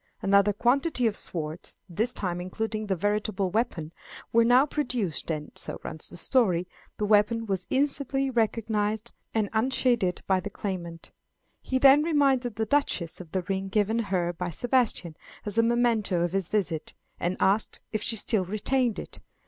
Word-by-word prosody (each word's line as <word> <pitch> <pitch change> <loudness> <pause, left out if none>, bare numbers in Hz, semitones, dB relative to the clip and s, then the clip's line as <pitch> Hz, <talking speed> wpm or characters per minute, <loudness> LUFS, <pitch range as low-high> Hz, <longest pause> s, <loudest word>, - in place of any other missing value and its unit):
Another 200 +1 +4
quantity 250 - +1
of 220 -2 +1
swords, 160 -3 -5
this 215 +7 -1
time 175 -5 -2
including 215 +4 -3
the 195 - +1
veritable 205 0 -1
weapon, 180 -8 -1 0.4
were 230 0 +6
now 245 +4 +5
produced, 245 - -2
and, 150 -2 -3
so - - -6
runs 155 - -6
the - - -9
story, 180 -4 +2 0.3
the 210 - -1
weapon 215 +2 +3
was 190 -3 -2
instantly 275 0 +1
recognized 220 -2 -1 0.2
and 215 -2 +2
unsheathed 235 -5 +1
by 190 -1 +2
the 185 - -5
claimant. 175 -5 -6 0.5
He 260 - -1
then 275 +2 +7
reminded 275 -7 +2
the 220 +1 -1
Duchess 210 - 0
of 165 -3 -12
the 185 -1 -1
ring 195 +1 -2
given 210 +3 +1
her 175 -2 0
by 175 +1 -4
Sebastian 230 - 0 0.3
as 210 +1 0
a - - +8
memento 230 -6 +2
of 175 -1 0
his 195 -2 -1
visit, 180 -7 -2 0.2
and 180 +2 -1
asked 200 +3 +1
if 215 - -2
she 225 - -1
still 215 -2 +1
retained 230 +4 0
it. - - -8
210 Hz, 165 wpm, -27 LUFS, 185-240 Hz, 0.5 s, a